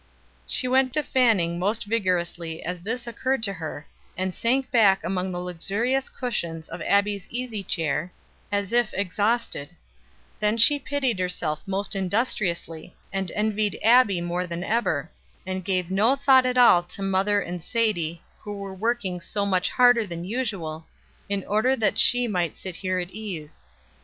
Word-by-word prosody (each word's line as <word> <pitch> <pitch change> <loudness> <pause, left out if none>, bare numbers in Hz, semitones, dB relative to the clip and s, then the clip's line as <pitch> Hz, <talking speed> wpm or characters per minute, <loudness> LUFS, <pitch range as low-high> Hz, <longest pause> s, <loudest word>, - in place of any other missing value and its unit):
She 255 - +1
went 260 0 +2
to 305 - +1
fanning 205 -12 +2
most 205 +5 0
vigorously 175 -6 -1
as 180 +1 -4
this 230 +6 -4
occurred 255 +1 -1
to 200 -3 0
her, 160 -4 -6 0.3
and 185 0 -2
sank 255 +6 0
back 205 -5 +4
among 185 +1 -2
the 175 - -4
luxurious 200 +9 -1
cushions 170 -10 -4
of - - -8
Abbie's 200 -1 +1
easy 240 -4 -4
chair, 165 -1 -2 0.4
as 200 +1 -1
if 240 -2 +2
exhausted; 200 -4 -1 0.6
then 210 +1 +1
she 290 +6 +6
pitied 265 -7 -1
herself 175 -4 -2
most 195 +2 -2
industriously, 185 -5 -2 0.2
and 195 -2 -2
envied 210 0 0
Abbie 225 -5 +5
more 175 +1 -2
than 170 0 -4
ever, 185 -9 0 0.3
and 185 0 -4
gave 185 -1 -1
no 215 +7 +3
thought 270 -2 +5
at 250 0 -1
all 240 -8 +7
to 180 +3 -8
mother 195 +2 +2
and 175 -3 -5
Sadie, 175 -8 -1 0.2
who 205 -1 -7
were 200 -1 -6
working 195 -3 -2
so 200 +3 -2
much 185 -1 +1
harder 245 -3 +4
than 170 -1 -6
usual, 190 -9 -3 0.4
in 200 -1 -1
order 220 +6 +2
that 220 -5 +1
she 245 0 +5
might 175 -7 -1
sit 185 -3 -7
here 185 -1 -1
at 180 0 -3
ease. 185 -8 -7
200 Hz, 160 wpm, -25 LUFS, 180-230 Hz, 0.6 s, all